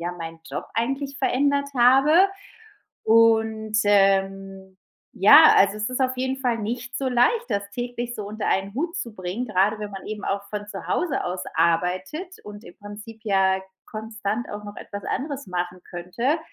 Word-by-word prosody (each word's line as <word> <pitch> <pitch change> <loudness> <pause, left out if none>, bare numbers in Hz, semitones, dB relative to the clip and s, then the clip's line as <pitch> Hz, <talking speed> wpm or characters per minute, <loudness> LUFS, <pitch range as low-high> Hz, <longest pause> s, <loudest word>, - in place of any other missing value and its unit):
ja 175 +1 -3
meinen 165 -2 -8
Job 145 - -4
eigentlich 270 +4 -2
verändert 280 +1 +1
habe 275 +9 +6 0.8
und, 220 -1 +3
ähm, 195 -1 +1 0.4
ja, 290 +12 +8
also 200 +1 +4
es 215 - -1
ist 255 - -3
auf 255 0 +1
jeden 260 +1 -1
Fall 245 -3 0
nicht 240 +4 -4
so 270 -1 -1
leicht, 445 - +2
das 200 0 -2
täglich 240 +1 -5
so 205 -2 -5
unter 215 +1 -5
einen 195 +2 -1
Hut 335 +6 -2
zu 240 -10 -5
bringen, 185 +6 -4
grade 210 +1 +1
wenn 210 -1 -5
man 195 - -8
eben 210 -1 -6
auch 200 0 -2
von 210 -1 -5
zu 195 - -8
Hause 320 -7 -1
aus 180 +1 -3
arbeitet 185 - 0
und 210 +1 -10
im - - -14
Prinzip 210 +2 -10
ja 190 -2 +2 0.3
konstant 220 +1 -4
auch 205 0 -7
noch 205 0 -9
etwas 200 0 -8
anderes 280 -1 -4
machen 180 0 -4
könnte. 210 - -1
215 Hz, 170 wpm, -24 LUFS, 195-255 Hz, 0.8 s, ja